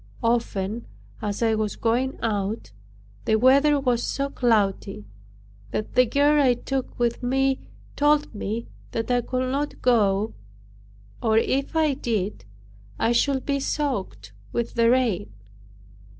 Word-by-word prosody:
Often, 230 -2 -1 0.3
as 210 +1 -2
I 225 -1 +3
was 215 -1 -1
going 245 +3 0
out, 205 - -2 0.5
the 220 - +3
weather 275 +5 +5
was 250 -3 +1
so 275 0 -1
cloudy, 200 - 0 0.6
that 215 - -4
the 250 0 +5
girl 290 +4 +3
I 255 -3 +4
took 265 +1 -4
with 240 -1 0
me 270 +2 +1 0.4
told 295 0 +2
me 220 +2 -3 0.3
that 225 +2 -2
I 245 0 +3
could 255 +2 -2
not 290 +2 -2
go; 215 -3 +2 0.9
or 220 -1 +2
if 275 +6 0
I 310 -3 +3
did, 210 - -3 0.5
I 230 - +1
should 265 +2 +1
be 280 -1 0
soaked 245 - -3 0.2
with 235 - -2
the 230 -1 +3
rain. 235 - +1
240 Hz, 135 wpm, -24 LUFS, 215-270 Hz, 0.9 s, weather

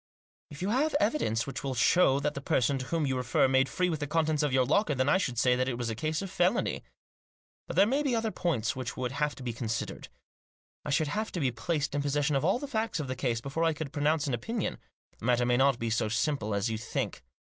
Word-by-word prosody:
" - - -79
If 145 +4 -8
you 195 - 0
have 285 +5 +1
evidence 120 - +1
which 135 - -6
will 135 -2 -2
show 135 +2 +4
that 150 - 0
the 140 - -6
person 135 0 +1
to 130 - -5
whom 165 0 0
you 135 -1 0
refer 125 +1 +2
made 130 0 +3
free 180 -1 0
with 160 -4 -2
the 145 - -3
contents 155 -1 +1
of 150 -2 +1
your 130 0 +3
locker, 150 - +2
then 130 +1 +1
I 185 - +4
should 125 -10 -2
say 125 +1 +4
that 130 +1 0
it 120 - -3
was 120 -2 -2
a - - -4
case 155 - -2
of 195 - -6
felony. 185 +3 +1 0.8
But - - -5
there - - +6
may 270 +7 +1
be 275 -5 +1
other 225 -1 0
points 135 - -1
which 130 -2 -5
would 125 -1 -2
have 145 +1 -1
to 130 - -10
be 120 -2 -3
considered. 115 - -4 0.8
I - - -5
should 145 +1 +1
have 215 +8 -2
to 175 - -2
be 135 -5 +1
placed 140 +6 -2
in 145 - 0
possession 145 +1 0
of 135 - +1
all 190 +8 +3
the 285 - -6
facts 220 - -1
of 145 - -3
the 130 - -2
case 115 -2 -1
before 140 +6 -2
I 165 -1 +3
could 150 -2 -6
pronounce 150 +1 +1
an 140 - -2
opinion. 215 - -3 0.4
The - - -8
matter 120 0 +3
may 120 0 +2
not 135 -1 +4
be 115 -1 -2
so 110 -1 +1
simple 110 -2 0
as 100 +3 0
you 110 -1 -2
think." 115 - -3
140 Hz, 265 wpm, -29 LUFS, 125-165 Hz, 0.8 s, there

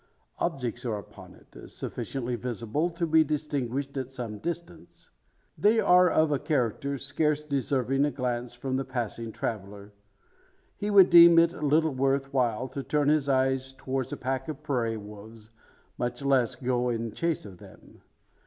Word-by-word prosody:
Objects 125 -8 -2
are 115 -4 -2
upon 100 - -12
it - - -15
sufficiently 125 -2 -4
visible 120 +6 -2
to 170 0 -2
be 160 0 +5
distinguished 140 -3 -3
at 130 -1 -4
some 115 -5 -6
distance. 170 0 -7 0.4
They 220 +2 +3
are 180 -2 +5
of 155 -1 +2
a 145 - +1
character 140 0 -1
scarce 150 +3 -1
deserving 135 -1 0
a - - +1
glance 125 -3 -3
from 130 +1 -3
the 135 - -1
passing 120 -3 -4
traveller. 100 -2 -6 0.8
He 205 - -3
would 195 -3 +6
deem 170 -1 +9
it 165 +1 +5
little 155 +1 +2
worth 135 +1 0
while 125 -1 0
to 140 - -5
turn 145 +1 +1
his 150 -2 +2
eyes 130 0 +1
towards 130 -1 -4
a - - -4
pack 130 +1 -3
of 155 -1 -7
prairie 120 -6 -1
wolves, 105 +1 -12 0.5
much 120 +2 -3
less 135 -4 +2
go 125 -1 -1
in 115 -1 -2
chase 165 -1 -2
of 95 -4 -11
them. - - -16
135 Hz, 160 wpm, -27 LUFS, 120-150 Hz, 0.8 s, deem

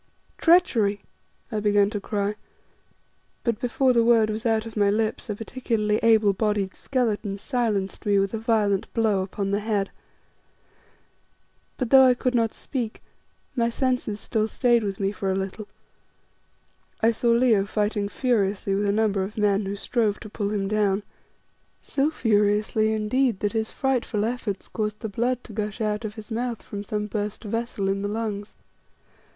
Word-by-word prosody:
"Treachery!" 230 - +3 0.5
I 215 - -1
began 205 -1 +3
to 205 -2 -3
cry, 205 0 -1 1.1
and 230 -3 0
before 255 +1 +2
the 235 -1 +4
word 230 -2 +4
was 220 +3 -2
out 225 0 +1
of 225 - -9
my 205 -2 +3
lips, 215 +2 -1
a 210 - -1
particularly 225 -2 -1
able 220 -3 +4
bodied 205 -2 0
skeleton 215 -6 -1
silenced 210 -5 -1
me 205 -1 +2
with 195 +1 +1
a 225 - -2
violent 215 -3 +1
blow 220 -4 +2
upon 195 +1 -3
the 200 - +1
head. 210 -2 -1 1.9
But 250 -3 -3
though 270 -1 +9
I 255 -1 +6
could 255 +1 -1
not 230 -2 +2
speak, 240 -5 -5 0.5
my 235 -2 +2
senses 250 -4 -1
still 220 0 -1
stayed 240 0 +2
with 195 -2 -3
me 195 0 0
for 195 -2 -2
a - - 0
little. 195 +2 -4 1.3
I 225 +1 +5
saw 235 +1 0
Leo 230 -4 +4
fighting 205 -1 -1
furiously 205 -6 0
with 200 +1 +1
a 200 - +2
number 205 -2 +1
of 195 +3 -5
men 205 -1 +2
who 200 - -3
strove 210 0 0
to 215 - -9
pull 205 -2 -2
him 200 -2 -1
down, 205 -1 +1 0.8
so 280 +2 0
furiously, 215 -4 +2
indeed 220 +1 +1
that 205 - 0
his 220 -1 -1
frightful 245 -5 0
efforts 230 -4 -3
caused 215 -1 -3
the 220 - -3
blood 245 +4 -1
to 220 - -11
gush 210 +1 -3
out 210 0 -1
of 215 -1 -5
his 220 0 -10
mouth 235 0 -3
from 205 0 -6
some 210 0 -2
burst 210 +1 -4
vessel 225 -2 -2
in 195 0 0
the 205 - -1
lungs. 210 -1 -4
215 Hz, 170 wpm, -25 LUFS, 205-230 Hz, 1.9 s, though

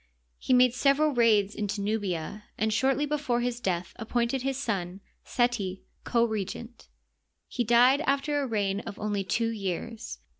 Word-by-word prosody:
He - - -3
made 250 -1 +6
several 280 +3 +3
raids 215 -4 +3
into 205 -1 -3
Nubia, 200 -2 -3
and 220 0 0
shortly 270 +5 +2
before 285 -5 -1
his 245 0 -2
death 180 -6 -2
appointed 240 +2 -1
his 270 0 -1
son, 195 -8 -3 0.2
Seti, 235 -7 -1 0.2
co 235 -1 +3
regent. 225 +2 -5 0.6
He 245 - -2
died 245 +5 +5
after 285 +1 +1
a 275 - -2
reign 200 -4 0
of 215 -1 -8
only 205 -2 -2
two 230 +4 0
years. 220 +2 -4
230 Hz, 150 wpm, -28 LUFS, 205-250 Hz, 0.6 s, made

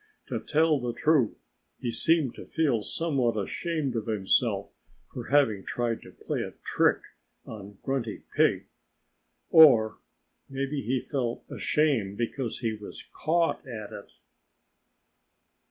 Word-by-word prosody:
To - - -2
tell 155 -1 +2
the 120 -1 -3
truth, 145 -7 +2 0.4
he 120 - -3
seemed 155 +2 +2
to - - -11
feel 140 -9 +1
somewhat 130 -3 0
ashamed 145 - -2
of 115 -1 -3
himself 105 -4 +1 0.4
for 120 - -6
having 115 -8 +3
tried 120 -2 -2
to - - -13
play - - -4
a - - -5
trick - - +2 0.4
on 100 -2 -10
Grunty 130 -5 -3
Pig. - - +3 0.9
Or 125 -10 +7 0.5
maybe 135 +1 -2
he 130 0 -1
felt 125 -5 -3
ashamed 125 -11 +1
because 120 +1 -3
he 115 -3 0
was 105 -1 -9
caught 165 +1 +1
at 110 -4 -7
it. - - -9
125 Hz, 125 wpm, -28 LUFS, 110-150 Hz, 0.9 s, Or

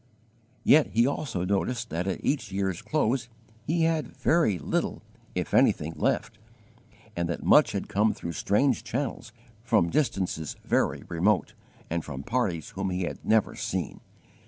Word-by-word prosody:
Yet 155 0 +6
he 115 +1 +2
also 130 - -2
noticed 115 +5 -1
that 85 +3 -2
at 95 - -3
each 140 -7 0
year's 95 -2 -1
close 130 -5 0 0.4
he 165 +2 +2
had 160 -2 0
very 160 - +3
little, 75 - -2 0.3
if - - -3
anything, 80 +2 +3
left, - - -1 0.8
and 85 0 -1
that 85 - -3
much - - +5
had - - -3
come 105 +2 +2
through 85 - -6
strange 105 - +1
channels, 125 -2 -3 0.3
from 110 -8 +2
distances 95 - -1
very - - +1
remote, 90 +4 +1 0.3
and 85 0 -2
from 65 +1 -6
parties 95 - -1
whom 95 0 -3
he 90 0 -1
had 85 - -5
never 110 -2 +2
seen. - - -3
100 Hz, 150 wpm, -27 LUFS, 85-125 Hz, 0.8 s, Yet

